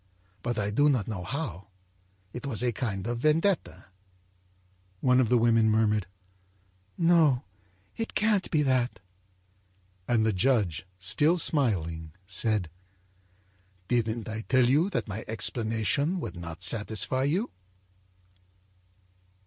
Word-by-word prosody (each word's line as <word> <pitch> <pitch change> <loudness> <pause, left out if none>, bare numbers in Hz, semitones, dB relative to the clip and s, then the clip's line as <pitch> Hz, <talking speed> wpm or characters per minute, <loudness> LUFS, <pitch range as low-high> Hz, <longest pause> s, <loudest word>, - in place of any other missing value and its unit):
But 120 +2 -3
I 105 0 -1
don't 135 -2 +2
know 100 -5 -4
how. 100 - -5 0.7
It 125 +3 -6
was 120 -3 -2
a 125 - +2
kind 105 -5 -3
of 120 0 -2
vendetta.â 160 +7 +1 1.2
One 125 +2 +3
of 125 -4 +2
the 125 - +4
women 115 -1 +4
murmured: 110 -3 +2 0.9
âNo, 165 -6 +4 0.5
it 225 - -5
can't 210 -3 +1
be 150 -2 +2
that.â 130 -3 +1 1.1
And 115 -2 +2
the 110 - +2
judge, 95 -5 +1
still 145 - +2
smiling, 85 - 0
said: 95 -2 +1 1.2
âDidn't 115 -2 0
I 110 0 -4
tell 130 -2 +4
you 150 +9 +3
that 190 - -2
my 105 +1 -5
explanation 115 - -1
would 160 - -6
not 85 0 -8
satisfy 115 +5 0
you? 180 - 0
115 Hz, 115 wpm, -28 LUFS, 105-140 Hz, 1.2 s, the